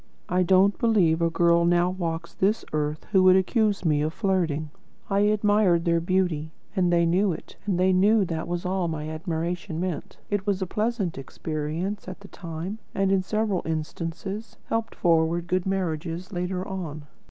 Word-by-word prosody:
I 180 +1 +2
don't 190 +3 +4
believe 180 -8 +3
a 165 - +3
girl 170 0 +3
now 175 +1 +3
walks 170 -2 -4
this 205 +4 +1
earth 150 0 -2
who 190 -3 +5
would 185 0 +7
accuse 205 +1 +1
me 150 -2 +3
of 155 +1 -1
flirting. 165 -7 0 0.4
I 195 - +3
admired 205 -4 +3
their 170 -1 +3
beauty, 170 -3 0 0.3
and 180 -3 +2
they 170 -1 +4
knew 185 +4 +2
it, - - -10
and 185 -3 +1
they 185 +1 +4
knew 200 +3 +4
that 165 -2 -3
was 175 0 -3
all 185 -1 0
my 155 -2 -3
admiration 165 +2 -3
meant. 180 -4 -4
It 205 0 -1
was 200 -2 +1
a 190 - -1
pleasant 210 - -1
experience 155 +8 -4
at 185 +1 -8
the 200 - -11
time, 175 +4 -6 0.2
and, 195 -1 +2
in 195 -1 +3
several 210 -1 0
instances, 165 +7 -4
helped 225 0 -2
forward 165 0 +2
good 185 +1 -1
marriages 180 0 -2
later 180 +1 -2
on. 165 -6 -5
180 Hz, 175 wpm, -26 LUFS, 165-195 Hz, 0.4 s, would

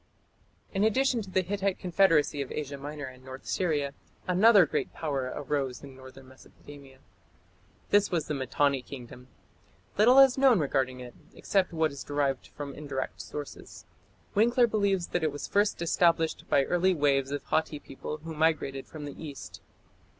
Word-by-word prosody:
" - - -35
In 195 0 +1
addition 245 +2 +2
to 195 - -9
the 185 0 +1
Hittite 195 +1 -1
confederacy 165 -5 +2
of 135 - -5
Asia 145 -2 -4
Minor 145 +1 -6
and 130 -1 -12
North 130 0 -10
Syria, 150 -6 -1 0.3
another 195 +1 +6
great - - -2
power 135 -5 -3
arose 140 -3 -3
in 135 -2 -11
northern 130 0 -13
Mesopotamia. 135 +1 -15 0.9
This 205 0 +4
was 165 -4 -1
the 150 - -3
Mitanni 140 0 0
Kingdom. 125 -1 -11 0.7
Little 245 +5 +6
is 270 -1 +7
known 265 -4 +6
regarding 130 -4 -1
it, 125 -1 -9 0.2
except 195 -2 0
what 160 -2 +1
is 140 - -8
derived 140 -2 -1
from 145 -1 -8
indirect 140 -3 -5
sources. 145 -1 -9 0.5
Winckler 240 +4 +4
believes 200 -5 0
that 175 - -1
it 155 - +1
was 145 - -6
first 205 -3 +1
established 165 -1 +2
by 140 - +4
early 180 +5 +2
"waves" 140 -3 +2
of 145 0 -4
Hatti 160 -1 -1
people 145 +1 -7
who 165 0 -6
migrated 150 -4 0
from 155 -2 -8
the 145 +2 -9
east. 145 -4 -9
150 Hz, 165 wpm, -28 LUFS, 135-185 Hz, 0.9 s, is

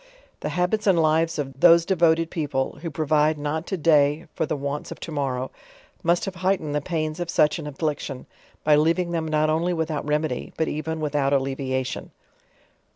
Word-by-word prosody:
The - - -3
habits 180 +4 0
and 185 -4 +5
lives 160 +1 +2
of 135 -2 -4
these 170 -1 +7
devoted 165 -3 +2
people, 140 -4 -2
who 170 - -3
provide 155 0 +2
not 150 +3 -3
to 190 - -2
day 150 -1 +3
for 160 - -1
the - - -1
wants 140 +1 -4
of - - -7
to - - -6
morrow, 130 -3 -2 0.5
must 175 -1 +2
have 195 - -4
heightened 185 -6 0
the 150 - 0
pains 155 0 -2
of 175 -1 -3
such 150 0 +3
an 150 - -6
af 140 -2 -8
fliction, 145 -4 -3 0.4
by 150 -1 +5
leaving 170 +3 +2
them 165 -2 -1
not 155 0 +2
only 170 +3 +1
without 160 -3 -2
remedy, 150 -3 -1
but 160 - +1
even 160 +1 -3
without 145 -2 0
allevia 135 -1 0
f 130 - -4
ion. - - -10
155 Hz, 195 wpm, -24 LUFS, 145-165 Hz, 0.5 s, these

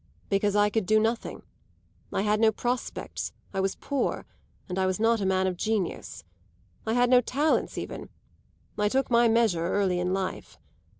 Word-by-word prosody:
"Because 200 0 +1
I 205 0 +3
could 215 -3 -1
do 215 +2 +5
nothing. 225 +2 -2 0.7
I 195 - 0
had 210 0 +2
no 220 -1 +5
prospects, 245 +3 -3 0.2
I 195 - -2
was 190 0 0
poor, 280 -2 -2 0.4
and 180 0 -3
I 190 - +2
was 185 +1 -1
not 225 0 +2
a 195 - 0
man 190 0 +2
of 185 -1 -1
genius. 215 -2 -2 0.6
I 220 - +1
had 245 +1 +4
no 250 -1 +7
talents 285 +6 0
even; - - -6 0.7
I 210 0 +2
took 265 +2 0
my 235 0 +5
measure 220 -8 +2
early 185 -2 +1
in 180 +1 -1
life. 190 0 -4
210 Hz, 175 wpm, -27 LUFS, 190-230 Hz, 0.7 s, no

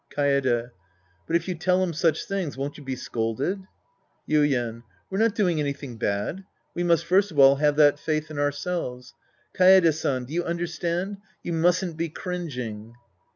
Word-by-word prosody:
Kafde. 130 -4 +1 0.6
But 165 - 0
if 170 - 0
you 185 - -1
tell 180 +2 +1
him 175 -2 -1
such 165 +1 +1
things, 190 -9 -3
won't 140 +2 -4
you 150 - -11
be 130 -1 -3
scolded? 130 - -3 0.6
Yuien. 125 -7 +1 0.3
We're 190 - -1
not 225 -1 +2
doing 180 -7 +1
anything 140 -4 -4
bad. 105 - -2 0.3
We 175 - -3
must 170 -1 +2
first 195 +4 +3
of 155 - -10
all 135 0 +7
have 150 0 +2
that 145 -1 +5
faith 155 +1 -2
in 150 - -5
ourselves. 145 -3 -3 0.4
Kaede 185 -3 +6
San. 130 -4 -2
Do 140 - -10
you 175 +1 0
understand? 175 +3 -2 0.3
You 170 - -3
mustn't 175 0 +1
be 165 0 -2
cringing. 125 - -6
155 Hz, 165 wpm, -25 LUFS, 135-175 Hz, 0.6 s, all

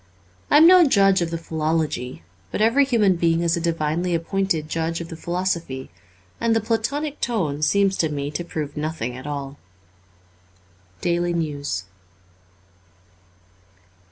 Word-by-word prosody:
I - - +6
am 310 - +8
no 365 +1 +8
judge 195 - +4
of 170 - -1
the 165 - -3
philology, 155 - -2 0.3
but - - -4
every 230 +6 +4
human 215 -8 +2
being 165 0 +2
is 170 0 +1
a 170 - -3
divinely 165 +1 0
appointed 170 -2 -1
judge 165 +1 -2
of 170 -1 -7
the 165 - -7
philosophy: 170 - -3 0.5
and 230 -1 +2
the - - +4
Platonic 255 +7 -2
tone 165 -12 -1
seems 195 +4 +2
to 160 - +1
me 145 -1 -3
to 175 - -3
prove 150 -4 -5
nothing 150 -6 -3
at 130 +3 -8
all. 140 -1 -5 0.7
* 90 0 -34
Daily 175 0 0
News. 145 - -2
165 Hz, 145 wpm, -23 LUFS, 145-195 Hz, 0.7 s, am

